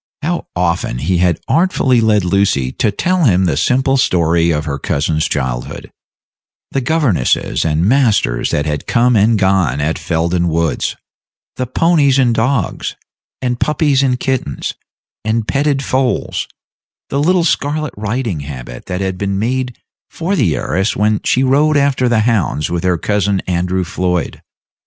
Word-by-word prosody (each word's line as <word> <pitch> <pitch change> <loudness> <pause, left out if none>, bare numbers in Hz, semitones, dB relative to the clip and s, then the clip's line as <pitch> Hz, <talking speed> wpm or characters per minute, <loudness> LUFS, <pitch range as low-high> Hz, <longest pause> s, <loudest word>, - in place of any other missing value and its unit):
How 170 +3 -2
often 90 -7 -1
he 85 +7 0
had 90 -2 +2
artfully 135 -8 +2
led 105 -4 +2
Lucy 90 -9 +1
to 110 - 0
tell 175 - 0
him 95 -5 +3
the 85 - +1
simple 130 - +2
story 85 -7 +2
of 75 -1 0
her 70 -2 -3
cousin's 80 +3 0
girlhood 65 -4 -4 0.8
the 135 - -1
governesses 125 - +1
and 80 +1 +1
masters 110 - +2
that 75 - 0
had 75 -2 -3
come 125 0 +3
and 110 +2 +3
gone 95 -8 +1
at 75 +3 -1
Felden 85 +1 0
Woods 85 -1 -1 0.6
the 130 - -3
ponies 145 -1 +3
and 125 -3 +3
dogs, 115 -3 -1 0.5
and 125 -1 -1
puppies 150 -3 +2
and 125 -2 +1
kittens, 130 - -2 0.5
and 110 0 -1
petted 140 -1 0
foals; 130 -1 -1 0.6
the 140 - 0
little 175 +3 +3
scarlet 150 -1 -1
riding 110 - -2
habit 65 -4 -8
that 90 +1 -3
had 95 -1 -3
been 100 -1 -1
made 125 +3 -2 0.3
for 180 +5 -2
the 100 - +1
heiress 95 +3 -1
when 105 +1 +1
she 130 - +2
rode 145 +3 +3
after 140 -3 +2
the 115 -2 +2
hounds 105 -10 0
with 85 -1 -2
her 90 -1 +1
cousin 100 +2 0
Andrew 90 +1 -1
Floyd. 90 -1 -2
105 Hz, 150 wpm, -16 LUFS, 85-130 Hz, 0.8 s, him